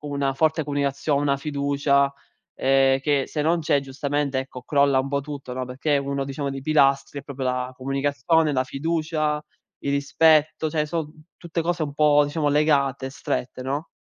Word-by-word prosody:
una 140 -2 -2
forte 160 +2 +1
comunicazio 140 0 -1
una 140 0 +1
fiducia, 140 -1 +1 0.4
ehm, 135 0 +3
che, 140 -1 +1
se 150 - -3
non 165 +3 +2
c'è, 150 -3 +2
giustamente, 140 0 -2
ecco, 130 -1 -6
crolla 140 -1 +3
un 130 +1 -1
po' 140 0 0
tutto, 140 -3 -7
no, 130 0 -3
perché 135 +4 -1
uno, 140 0 -2
diciamo, 140 +1 -4
dei 135 0 -5
pilastri 140 -1 +2
è - - -18
proprio 135 -2 -6
la 125 0 -1
comunicazione, 140 +4 +1
la 130 -1 +1
fiducia, 155 +1 -1 0.4
il 140 - -2
rispetto, 155 +2 +3
cioè, 155 0 0
son 155 -1 -4 0.2
tutte 170 -1 -4
cose 170 -1 -1
un 145 - -6
po', 145 0 +4
diciamo, 145 +1 -1
legate, 140 -3 +2
strette, 130 -2 -4
no? 140 +5 -3
140 Hz, 170 wpm, -24 LUFS, 135-150 Hz, 0.4 s, po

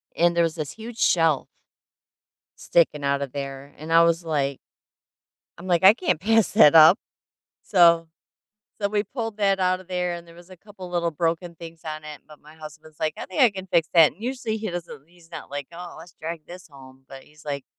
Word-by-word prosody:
And 170 0 +2
there 170 - +3
was 165 -1 -1
this 150 -3 -5
huge 225 +4 -10
shelf 165 - +2 1.1
sticking 155 -4 +1
out 140 0 0
of 140 -2 -4
there. 140 0 -7
And 155 +2 -8
I 165 - +7
was 170 +1 +1
like 140 -4 -2 1.0
I'm 175 - -10
like, 175 -1 +1
"I 195 +3 +9
can't 245 - -1
pass 225 +3 +2
that 165 -7 +6
up." 160 +4 +8 0.7
So 170 -3 +4 0.7
so 200 - 0
we 205 0 0
pulled 225 -2 -6
that 195 -2 +2
out 185 0 +1
of 185 - -17
there 180 -1 -2
and 170 0 -10
there 170 - -16
was 175 +1 -17
a 185 - -12
couple 190 0 -12
little 170 -1 -1
broken 165 +2 -3
things 165 0 -11
on 155 -1 -6
it, 150 -1 -9
but 150 -1 -16
my 150 +1 -17
husband's 155 0 -13
like, 155 -1 -1
"I - - -7
think 185 - -1
I 245 - +6
can 190 -1 -8
fix 170 -3 +1
that." 165 -3 +6
And 195 - -19
usually, 245 -3 -3
he 220 -2 -5
doesn't 165 -4 -8
he's 170 -1 -22
not 165 - -9
like, 140 -1 -5
"Oh, 175 +1 -10
let's 165 0 -14
drag 165 -1 -6
this 180 0 -12
home." 135 -2 -16
But 135 0 -11
he's 150 +1 -21
like, 140 -2 -5
170 Hz, 215 wpm, -23 LUFS, 155-185 Hz, 1.1 s, I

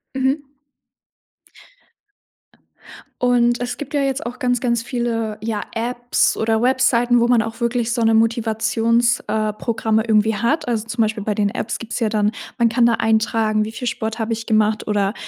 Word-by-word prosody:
Mhm. 270 +3 0 2.8
Und, 240 -1 +3
es 245 0 -4
gibt 290 0 -7
ja 290 - +2
jetzt 270 -1 -1
auch 245 +1 -6
ganz, 245 -3 0
ganz 235 -2 0
viele, 230 -3 -2
ja, 215 -1 -3
Apps 240 +1 0
oder 225 0 0
Webseiten, 245 -1 +3
wo 235 - +3
man 240 -2 +3
auch 225 +2 -7
wirklich 235 0 0
so 235 - -1
‘ne 225 0 +3
Motivations 225 +1 +2
äh, 215 0 -1
Programme 220 0 -1
irgendwie 220 -1 +2
hat. 235 +7 0
Also, 225 -2 -1
zum 230 0 -1
Beispiel 215 -1 -1
bei 210 - -1
den 205 -1 +1
Apps 220 - -4
gibt 230 0 -8
es - - -1
ja 225 - +2
dann 210 -1 +1 0.3
man 235 -1 +4
kann 235 +1 +3
da 235 - +3
eintragen, 220 -1 +1
wie 220 - -6
viel 245 +1 -4
Sport 220 +1 -4
habe 225 +1 -1
ich 225 0 -4
gemacht 215 0 +1
oder 205 -1 0
230 Hz, 180 wpm, -20 LUFS, 220-240 Hz, 2.8 s, man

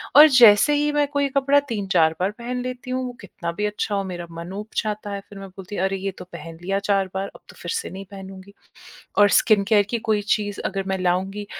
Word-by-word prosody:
और 300 +2 +11
जैसे 240 +3 +7
ही 295 0 +1
मैं 295 0 +2
कोई 285 0 0
कपड़ा 275 +1 +3
3-4 190 -7 +2
बार 190 +3 0
पहन 245 +1 -4
लेती 255 0 -6
हूँ, 255 0 -1
वो 245 - -5
कितना 170 -4 -6
भी 210 +5 -3
अच्छा 210 0 -2
हो, 200 - 0
मेरा 175 -2 -6
मन 170 +2 -8
ऊब 210 +2 -6
जाता 210 -1 -2
है। 200 - -3
फिर 200 - -10
मैं 195 - -8
बोलती 190 +2 -9
है, 180 - -2
"अरे! 195 0 0
ये 195 +1 -3
तो 180 - -9
पहन 165 0 -9
लिया 195 +2 -1
4 195 -1 +1
बार, 195 +1 -2
अब - - -13
तो - - -13
फिर - - -4
से 455 0 -3
नहीं 195 +1 -8
पहनूँगी।" 195 0 -10 0.6
और 205 0 +6
स्किन 210 -1 +4
केयर 210 -2 +5
की 235 - 0
कोई 210 -1 +3
चीज़ 205 -1 -4
अगर 195 0 -2
मैं 190 - -1
लाऊँगी, 190 +3 -1
200 Hz, 245 wpm, -23 LUFS, 190-235 Hz, 0.6 s, और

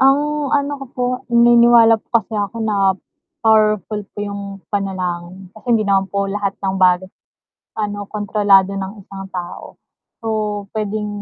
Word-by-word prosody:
Ang 290 +2 +2
ano 285 0 -1
ko - - -5
po, 250 - 0 0.2
naniniwala 235 -1 +6
po - - -44
kasi 225 0 -3
ako 210 +2 -2
na 195 -3 +2 0.5
powerful 215 -1 +3
po - - -49
yung 200 -1 -7
panalangin, 185 -2 -4
kasi 220 - -17
hindi 215 - 0
naman 195 -1 +2
po 200 0 -1
lahat 200 -1 -2
ng 190 0 0
bagay 185 0 +3 0.7
ano, 205 -1 -3
kontrolado 205 -2 +3
ng 195 +2 -5
isang 195 0 -9
tao, 175 -1 -7 0.4
so 225 - -8 0.5
pwedeng 210 0 -2
205 Hz, 145 wpm, -19 LUFS, 195-225 Hz, 0.7 s, naniniwala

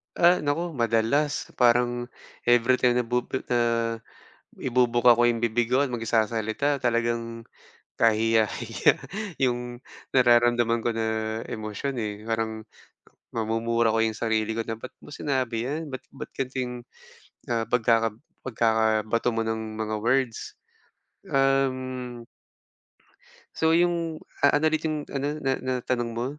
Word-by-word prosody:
Ah, 175 +1 +5
naku 165 +4 -1
madalas, 120 +4 0
parang 120 0 +3 0.4
every 120 +1 +4
time 125 -1 +3
na 125 - +2
bubu 125 +2 -2
ah, 115 -1 +1 0.6
ibubuka 120 -1 +3
ko 120 - +4
'yong 115 -1 0
bibig 115 0 +1
ko 135 +2 +4
at 135 - -3
magsasalita 115 +4 0
talagang 115 -1 -1 0.5
kahiya-hiya 110 -1 +2 0.5
'yong 120 -1 -1 0.3
nararamdaman 120 -2 +4
ko 120 - +2
na 110 0 -2
emosyon, 110 +5 -4
eh, 105 -2 -2 0.2
parang 110 -1 -2 0.7
mamumura 115 0 +1
ko 115 - +1
'yong 110 -1 0
sarili 110 -1 0
ko 115 - 0
na 115 - -3
"ba't 130 - -8
mo - - -12
sinabi 125 -5 -1
'yan, 150 +1 -4
ba't 130 0 -5
ba't 140 - -9
gan'to 130 0 -4
'yung, 125 -1 -3 0.7
ah, 115 -2 0
pagkaka 115 -2 +2 0.3
pagkakabato 110 -1 +1
mo 115 - -1
ng 110 0 -2 0.2
mga 110 0 -2
words," 120 0 0 0.7
um 130 -3 0 1.3
So 160 0 +2
'yung 170 -2 +1 0.2
a 145 - +6
ano 155 - 0
ulit 155 0 0
'yung 155 -2 -2
ano, 140 +1 -2
na 135 - 0
na 130 0 -1
tanong 120 -2 -1
mo? 115 +1 -3
120 Hz, 130 wpm, -26 LUFS, 115-130 Hz, 1.3 s, a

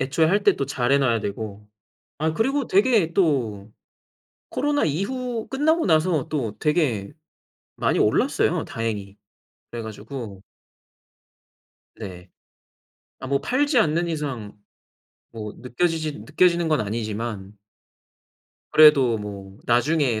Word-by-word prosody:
애초에 135 +5 +2
할 200 +5 +2
때 - - +4
또 140 - -2
잘해 135 +1 +1
놔야 120 -5 +2
되고. 105 0 -6 0.5
아 155 +1 0
그리고 265 - 0
되게 200 -4 +3
또 115 - 0 0.8
코로나 290 +1 0
이후 225 - -2
끝나고 315 +5 +1
나서 160 -3 +2
또 120 -9 -3
되게 140 - 0 0.6
많이 - - +1
올랐어요 - - +2
다행히. 105 -3 -4 0.5
그래 120 - -5
가지고 110 -1 -8 1.6
네. 90 -4 -9 0.9
아 130 - -6
뭐 140 +1 0
팔지 280 - +1
않는 170 -3 +2
이상 140 -10 -4 0.8
뭐 105 -2 -7
느껴지지 155 +5 -1
느껴지는 175 -2 +2
건 155 -1 +2
아니지만 105 -1 -4 1.1
그래도 140 -7 +6
뭐 100 -2 -8
나중에 120 0 +2
140 Hz, 225 characters per minute, -23 LUFS, 110-170 Hz, 1.6 s, 그래도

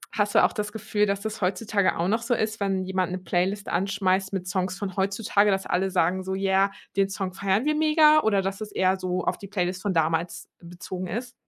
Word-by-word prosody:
hast 205 -1 0
du - - +6
auch - - +3
das 210 -2 -3
Gefühl, 210 -1 -1
dass 200 0 -1
das 220 0 -5
heutzutage 200 +2 0
auch 170 +2 0
noch 225 +3 +1
so 245 - 0
ist, 220 0 -2
wenn 195 -2 0
jemand 185 -1 -1
'ne 185 - -2
Playlist 185 +3 -1
anschmeißt 190 +1 0
mit 190 -2 -4
Songs 185 +1 -2
von 195 -2 -5
heutzutage, 200 +1 +1
dass 195 -1 0
alle 190 +2 0
sagen 185 +2 +1
so: 190 0 -3
„Yeah, 195 0 +2 0.2
den 195 0 +2
Song 195 -2 -4
feiern 200 +5 0
wir 305 - +2
mega“ 310 0 +5
oder 200 -5 +2
dass 195 +1 -3
es 210 -1 -6
eher 190 0 +2
so 185 0 -2
auf - - -1
die 200 - -9
Playlist 185 -2 -2
von 200 -2 -1
damals 165 +1 0
bezogen 180 +1 -7
ist? 235 +7 -5
195 Hz, 225 wpm, -25 LUFS, 185-210 Hz, 0.2 s, du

